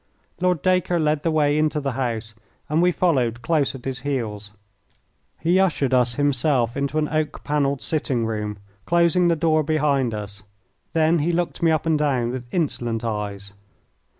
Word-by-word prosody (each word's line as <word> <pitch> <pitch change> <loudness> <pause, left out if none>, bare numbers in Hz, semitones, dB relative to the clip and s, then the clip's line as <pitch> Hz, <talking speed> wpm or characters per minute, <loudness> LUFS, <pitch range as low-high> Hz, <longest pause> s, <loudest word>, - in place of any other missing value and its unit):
Lord 180 -3 +1
Dacre 180 -1 +2
led 150 -1 +1
the 165 - 0
way 150 -1 +2
into 155 0 +1
the 140 -2 -2
house, 115 -3 -3 0.4
and 155 +3 +2
we 180 0 +4
followed 125 -10 0
close 150 -2 +1
at 130 - -11
his 130 -1 -3
heels. 115 -7 -3 0.9
He 175 +4 +2
ushered 150 -8 +1
us 125 -1 +3
himself 135 -3 +1
into 140 +2 -2
an 155 -1 +1
oak 155 -1 -2
panelled 140 -2 0
sitting 135 -7 -1
room, 105 -2 -3 0.3
closing 170 +1 +3
the 170 - +3
door 155 0 +2
behind 140 -6 +1
us. 100 -1 -7 0.5
Then 160 +1 +3
he 160 +4 +1
looked 175 0 -2
me 165 - +4
up 160 0 +1
and 160 -2 +2
down 130 -5 +1
with 125 -1 -7
insolent 120 -9 -2
eyes. 100 -2 -4
145 Hz, 170 wpm, -23 LUFS, 120-160 Hz, 0.9 s, we